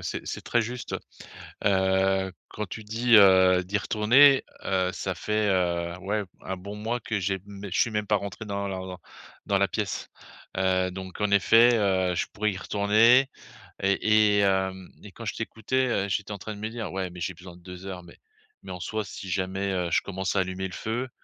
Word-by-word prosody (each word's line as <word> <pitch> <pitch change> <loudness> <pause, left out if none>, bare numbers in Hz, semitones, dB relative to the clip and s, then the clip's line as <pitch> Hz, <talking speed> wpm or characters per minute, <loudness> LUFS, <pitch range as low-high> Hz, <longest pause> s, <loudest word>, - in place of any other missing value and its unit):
c'est - - -5
c'est - - -5
très 120 - +1
juste. 120 +2 -5 0.7
Heu, 95 0 +2 0.2
quand 105 - -5
tu 110 +4 -8
dis, 115 +3 +2
heu, 95 -2 +6
d'y 100 +3 -1
retourner, 125 +7 +5 0.2
heu, 95 -1 0
ça 95 0 -3
fait, 105 +3 -1
heu, 85 -2 0
ouais 100 +2 -2
b - - -22
un 95 0 -4
bon 100 +3 -8
mois 115 +3 -3
que 110 -1 -2
j'ai 95 +1 -1
mê 100 -1 -8
je - - +2
suis 115 - +2
même 105 -1 -2
pas 105 - +3
rentré 100 +1 -6
dans 100 -1 -3
lar 95 -1 -4
lor 90 0 -8 0.5
dans - - +2
la - - +2
pièce. - - -3 0.5
Heu, 95 -1 +1
donc 95 0 -8
en 105 - +1
effet, 115 +4 +5
heu, 95 -3 +1
je - - -1
pourrais 105 0 0
y 95 - -6
retourner 110 +7 +4 0.5
et 105 +1 +3
et - - +4
hem, 95 -1 0
et - - -11
quand - - -10
je - - -2
t'écoutais, 130 +4 -1
heu, 100 -5 0
j'étais 105 +1 -2
en 100 - -4
train 105 +2 -7
de - - -11
me 110 - -3
dire: 115 -1 -5
«Ouais, 95 -1 -2
mais 90 0 -11
j'ai 95 - -2
besoin 90 0 -13
de 90 - -19
2 90 +1 -10
heures 90 -2 -6
mais - - -15 0.5
mais - - -8
en 90 - -6
soi, 110 +4 -3
si 95 0 -8
jamais, 95 +1 -1
heu, 90 -2 -1
je - - +3
commence 95 0 -3
à - - +4
allumer 95 +1 -3
le 90 - -11
feu, 120 +4 -3
100 Hz, 220 wpm, -26 LUFS, 95-105 Hz, 0.7 s, heu